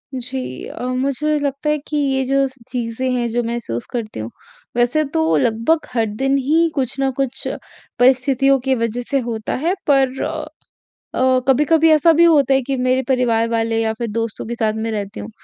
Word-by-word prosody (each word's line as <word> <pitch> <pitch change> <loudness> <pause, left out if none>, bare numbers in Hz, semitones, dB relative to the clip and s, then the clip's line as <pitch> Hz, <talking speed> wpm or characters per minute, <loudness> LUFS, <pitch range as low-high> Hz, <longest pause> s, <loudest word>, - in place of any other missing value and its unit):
जी। 255 +1 -4 0.3
अ, - - -8
मुझे 275 +4 0
लगता 285 +1 -2
है 300 - +2
कि 300 - -2
ये 270 -2 +1
जो 275 +1 +2
स 260 - -13 0.2
चीज़ें 245 +1 -2
हैं 240 -1 0
जो 240 +1 -1
महसूस 230 - -4
करती 225 - -4
हूँ, 110 +1 -5 0.5
वैसे 245 +6 +2
तो 320 0 +2
लगभग 235 +7 +1
हर 230 -2 +2 0.2
दिन 270 +1 +2
ही 315 +5 +2
कुछ 265 -4 -1
न 270 0 +1
कुछ 265 -1 -2 0.5
परिस्थितियों 265 +1 +4
की 265 - +2
वजह 230 0 -2
से 275 - +2
होता 220 -2 -3
है 360 - +2
पर 270 -2 +2
अ - - -3 0.7
अ, 255 0 +3
कभी-कभी 300 +4 +4
ऐसा 310 +2 +5
भी 340 - +6
होता 290 -6 +5
है 270 - +3
कि 275 - 0
मेरे 255 +1 +1
परिवार 240 -4 +2
वाले 225 0 0
या 220 - +1
फिर 235 +1 -4
दोस्तों 230 0 -3
के 235 - -3
साथ 220 -2 0
में 225 - -2
रहती 205 -1 -4
हूँ। 215 - -7
260 Hz, 195 wpm, -19 LUFS, 230-275 Hz, 0.7 s, भी